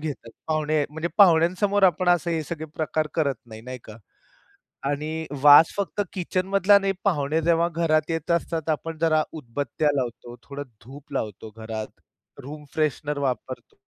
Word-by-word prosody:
घेतात. 145 -6 -6 0.2
पाहुणे 155 -1 +1
म्हणजे 160 +2 -3
पाहुण्यांसमोर 185 +3 +4
आपण 180 -1 +3
असे 175 -1 +2
हे 160 - -1
सगळे 160 +1 -6
प्रकार 155 0 -1
करत 140 -6 +1
नाही, 110 -1 -10
नाही 130 +1 -7
का? 110 - -11 0.9
आणि 155 +3 -2 0.2
वास 145 +2 +8
फक्त 200 +1 -2
किचन 185 0 -2
मधला 195 +1 +5
नाही 195 0 0
पाहुणे 160 -4 +1
जेव्हा 170 +1 +2
घरात 155 -2 +1
येत 165 0 -2
असतात. 165 -1 -1
आपण 160 +1 -2
जरा 155 -2 +3
उदबत्त्या 145 +1 -2
लावतो, 120 -2 -4
थोडं 140 0 -7 0.2
धूप 140 +3 -12
लावतो 110 +1 -4
घरात, 110 -1 -5 0.6
रूम 150 +2 -9
फ्रेशनर 150 -1 -1
वापरतो. 130 -5 -4
155 Hz, 150 wpm, -24 LUFS, 140-170 Hz, 0.9 s, वास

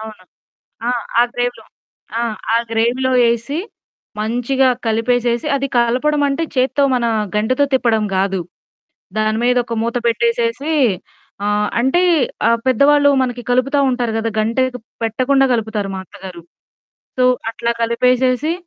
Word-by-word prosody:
అవును. 215 -4 -10 0.6
ఆ! - - +1 0.3
ఆ - - +6
గ్రేవ్‌లో. 245 0 -3 0.5
ఆ! - - 0 0.3
ఆ - - +5
గ్రేవ్‌లో 240 +3 +1 0.2
ఏసి 235 +7 -3 0.6
మంచిగా 245 +4 +1 0.2
కలిపేసేసి 240 +4 0
అది 275 0 -1
కలపడం 255 +6 +1
అంటే 280 +4 -1
చేత్తో 265 +2 +2
మన 240 -1 0 0.3
గంటెతో 255 +7 +2
తిప్పడం 230 -4 +2
కాదు. 190 0 0 0.8
దాని 215 0 +1
మీద 250 +1 +3
ఒక 235 - -4
మూత 235 +1 -3
పెట్టేసేసి 235 +5 0 0.7
ఆహ్, 210 0 +1
అంటే 265 +9 +2 0.5
ఆహ్, 230 0 +3
పెద్దవాళ్ళు 285 +3 +4
మనకి 245 -1 -2
కలుపుతా 265 +3 +2
ఉంటారు 245 -2 -1
కదా! 225 0 -1
గంటెకి 250 +3 0 0.2
పెట్టకుండా 260 +5 +2
కలుపుతారు 220 -3 -2
మా - - -4
అత్తగారు. 185 -2 -11 0.8
సో 255 - +3 0.3
అట్లా 235 +1 -2
కలిపేసేసి, 250 +5 +1
240 Hz, 125 wpm, -18 LUFS, 225-260 Hz, 0.8 s, ఆ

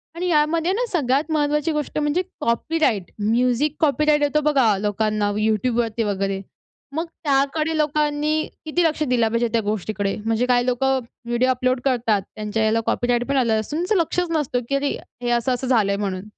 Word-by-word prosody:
आणि 355 +2 -2
यामध्ये 325 +1 +2
ना 480 +5 0
सगळ्यात 290 -1 +1
महत्वाची 300 +1 +1
गोष्ट 300 -1 -3
म्हणजे 295 +4 +1 0.2
कॉपीराइट. 235 - 0
म्युझिक 245 +7 +1
कॉपीराइट 300 -1 +2
येतो 290 +1 +2
बघा 245 -8 +3
लोकांना 210 +1 0
YouTubeवरती 225 +1 0
वगैरे. 195 -1 -1 0.5
मग 325 +2 -1 0.2
त्याकडे 305 +3 +1
लोकांनी 300 0 +1 0.2
किती 330 +3 +1
लक्ष 315 -1 +1
दिलं 250 -5 +2
पाहिजे 230 +1 0
त्या 230 - +2
गोष्टीकडे? 205 -1 -2
म्हणजे 225 +2 +1
काही 245 -1 +2
लोकं 265 +1 +1 0.3
व्हिडिओ 240 +2 +1
अपलोड 255 0 +1
करतात 235 -6 +1
त्यांच्या 215 0 -2
ह्याला 220 +1 +2
कॉपीराइट 245 0 0
पण 275 0 0
आलं 230 -4 +2
असून, 290 +9 -4
त्याचं 365 +5 0
लक्षच 350 +1 -1
नसतं 295 -6 0
की 275 - +1
अरे 280 +1 0 0.3
हे 240 - -2
असं-असं 245 +2 0
झालंय 215 -6 +2
म्हणून. 190 -2 -3
255 Hz, 165 wpm, -22 LUFS, 225-300 Hz, 0.5 s, बघा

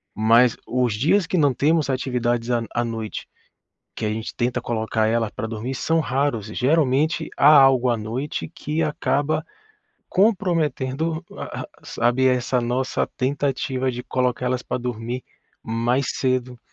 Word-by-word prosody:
Mas 115 +3 +4
os 125 -3 0
dias 165 - +2
que 185 - 0
não 145 -4 +3
temos 155 +2 +2
atividades 125 -2 -1
à 120 -1 +1
à 120 - +1
noite, 110 -2 -5 0.7
que - - -5
a 105 - 0
gente 110 +1 -5
tenta 125 +1 -1
colocar 110 -2 -1
ela 115 -1 +1
pra 110 - -5
dormir, 115 +4 -4
são 165 +5 +1
raros. 130 -6 -1
Geralmente 150 +5 +1
há 140 - +3
algo 135 -3 +6
à 120 - +1
noite 120 +10 -4
que 155 0 -3
acaba 150 +1 0 0.7
comprometendo 165 - +1
a - - -6
a - - -7 0.2
sabe, 120 +3 +1
essa 125 0 +1
nossa 125 +2 -1
tentativa 130 -1 -1
de 125 0 -6
colocar 125 -1 -1
elas 125 0 0
pra - - -2
dormir 120 0 -4 0.4
mais 120 +4 0
cedo. 125 -2 -1
125 Hz, 145 wpm, -23 LUFS, 120-145 Hz, 0.7 s, algo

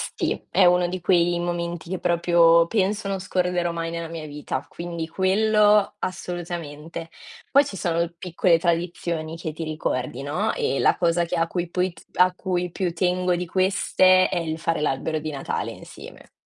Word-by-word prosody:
Sì, - - -2
è 190 - +4
uno 180 0 +4
di 185 +1 -4
quei 175 -1 +2
momenti 175 0 -3
che 185 - -2
proprio 170 -1 +4
penso 200 +2 0
non 195 -1 -2
scorderò 180 -2 -1
mai 165 0 -3
nella 170 0 -4
mia 165 -1 -7
vita, 145 -2 -5
quindi 170 -1 -5
quello 210 +3 +3
assolutamente. 170 -3 -5 0.4
Poi 280 +1 +6
ci 195 -8 -7
sono 170 0 0
piccole 175 -1 +2
tradizioni 170 -1 -2
che 160 -2 -5
ti 165 - -6
ricordi, 135 -4 -3
no, 180 +10 -1
ehm, 135 - 0
la - - +3
cosa 170 0 +2
che 170 - -3
a 165 - +2
cui 175 0 -3
poi 180 +1 0
p 160 - -16 0.2
a 180 0 +5
cui 180 -2 -2
più 180 -1 -2
tengo 180 0 +1
di 180 +1 -3
queste 185 0 +3
è 180 - -1
il 160 -1 -3
fare 165 -1 -1
l'albero 150 +2 -1
di 155 +1 -5
Natale 140 -2 -3
insieme. - - -12
175 Hz, 175 wpm, -24 LUFS, 165-185 Hz, 0.4 s, Poi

